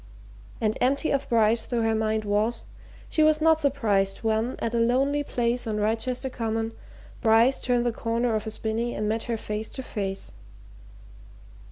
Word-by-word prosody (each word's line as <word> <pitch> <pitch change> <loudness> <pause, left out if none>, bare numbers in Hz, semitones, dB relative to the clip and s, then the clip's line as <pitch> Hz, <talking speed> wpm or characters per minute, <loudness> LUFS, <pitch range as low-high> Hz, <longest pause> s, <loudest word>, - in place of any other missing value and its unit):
And 215 -2 0
empty 275 +5 +2
of 280 0 -1
Bryce 225 0 +3
though 235 -2 0
her 225 0 +2
mind 220 0 0
was, 210 +3 0 0.4
she 315 - 0
was 310 0 +5
not 320 0 +4
surprised 220 -10 +1
when, 225 +2 0
at 230 - -3
a 235 - +1
lonely 270 +5 +2
place 240 -3 -1
on 215 -1 -1
Wrychester 230 +5 -1
Common, 225 -1 -2 0.5
Bryce 230 +3 +4
turned 245 -1 +1
the 240 - +2
corner 230 +1 -1
of 215 0 -2
a - - -1
spinny 225 +2 -2
and 210 - -2
met 220 +1 -1
her 230 -1 -2
face 215 0 -4
to 265 - -6
face. 195 -4 -4
230 Hz, 170 wpm, -26 LUFS, 220-250 Hz, 0.5 s, was